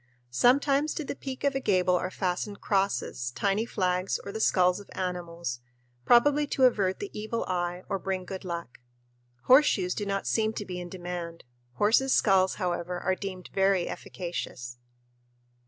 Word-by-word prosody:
Sometimes 275 - +3
to 315 - -3
the - - -3
peak 265 -1 -7
of 280 -1 +2
a 270 - 0
gable 185 -6 +2
are 180 +1 -1
fastened 190 +2 -3
crosses, 195 - 0
tiny 205 +3 0
flags, 185 -2 0
or 200 - -5
the 220 - -5
skulls 180 -3 +3
of 205 - -13
animals 170 -7 -4 0.5
probably 290 +5 +5
to 270 - 0
avert 200 -7 +3
the 405 - -6
Evil 220 +2 -3
Eye 180 0 -2
or 195 - -2
bring 185 -1 -3
good 190 +1 -6
luck. 170 -7 -6 0.6
Horseshoes 240 -9 +5
do 205 - -4
not 195 0 -1
seem 220 -1 +1
to 205 - -5
be 180 -2 -5
in 175 0 -7
demand. 175 -2 -6 0.3
Horses' 230 - +3
skulls, 190 -2 +3
however, 180 -1 -2
are 185 +2 0
deemed 185 -1 -6
very 195 -2 +2
efficacious. 120 -9 -6
190 Hz, 160 wpm, -28 LUFS, 180-220 Hz, 0.6 s, probably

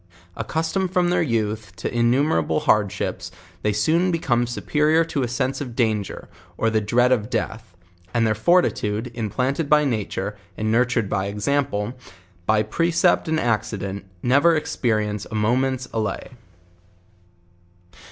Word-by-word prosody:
Accustomed 170 +4 -1
from 180 -1 +2
tlicir 175 -2 +2
youth 105 -3 -2
to - - -4
innumerable 120 - +2
hardship*, 100 -2 +1 0.4
they 105 - +1
soon 160 - +2
become 130 -9 +1
superior 150 +6 +2
to 150 -3 -2
a 125 - 0
sr,sc 130 +3 -2
of 125 -5 -6
danger, 110 -5 -1 0.3
or 115 - +1
the 110 -1 +2
dre 120 +4 +2
id 125 - +3
of 110 -4 +1
death; 110 -4 -4 0.4
and 115 +1 +2
their 110 - +2
fortitude, 110 - +1
implanted 130 +7 -1
by 150 0 +5
nature, 105 -5 -2 0.2
and 110 0 0
nurtur 120 0 +2
ed - - -6
by 95 0 0
example, 105 +1 -1 0.5
by 110 0 +3
precept 165 - +2
and 160 0 +1
accident, 100 -4 -2 0.2
never 140 +7 +4
experience 110 -8 -1
a 110 - -5
moment's 125 +4 +1
allay. 110 0 -3
120 Hz, 140 wpm, -23 LUFS, 105-145 Hz, 0.5 s, by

